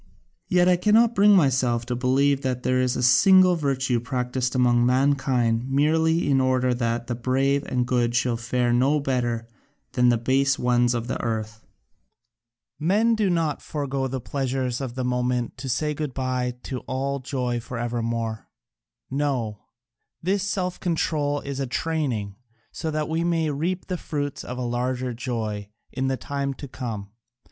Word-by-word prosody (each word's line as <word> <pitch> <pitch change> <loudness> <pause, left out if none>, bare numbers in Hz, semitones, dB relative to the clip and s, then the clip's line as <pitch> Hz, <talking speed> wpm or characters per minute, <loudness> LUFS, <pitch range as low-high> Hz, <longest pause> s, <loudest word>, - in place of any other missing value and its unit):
Yet 180 -1 +3
I 180 -1 +5
cannot 220 +5 +4
bring 205 -1 +6
myself 130 -7 +2
to 125 0 -2
believe 135 +3 +2
that 125 -2 -2
there 130 0 +2
is 125 -1 +1
a - - -1
single 185 +8 +6
virtue 135 -5 0
practised 125 +1 -2
among 120 -1 +3
mankind 130 -2 +2
merely 160 +4 +2
in 135 -2 +3
order 130 -1 +2
that 120 -1 -1
the 120 - -3
brave 135 +4 +1
and 125 -1 0
good 120 -1 +1
should 120 -1 +1
fare 120 0 0
no 135 +5 +3
better 120 -4 -1 0.4
than 125 -2 +3
the 120 - +3
base 135 +4 +2
ones 120 0 +2
of 115 -1 -2
the 125 - -3
earth. 110 -1 -4 1.1
Men 205 +9 +3
do 215 -3 +1
not 165 -4 0
forego 140 -3 -3
the 130 0 -3
pleasures 130 -1 -2
of 125 -3 -5
the 130 - -2
moment 125 -1 -1
to 135 +1 -5
say 150 +5 0
good 150 -3 -4
bye 125 -1 -1
to 130 - -4
all 140 +2 -2
joy 125 -2 -2
for 120 +1 -7
evermore 115 -1 -3 0.6
no, 130 -7 -1 0.6
this 190 +4 0
self 185 -2 -2
control 150 -4 0
is 140 -1 -5
a 135 - -1
training, 125 -9 -2 0.3
so 160 - -4
that 155 -1 -1
we 160 +1 -1
may 165 -3 +1
reap 175 +6 -2
the 180 - -3
fruits 145 -3 -4
of 125 - -6
a - - -3
larger 125 +1 -2
joy 110 -4 -4 0.2
in 130 0 -2
the 135 0 0
time 140 0 -3
to 140 - -8
come. 110 -6 -6
130 Hz, 165 wpm, -24 LUFS, 120-145 Hz, 1.1 s, bring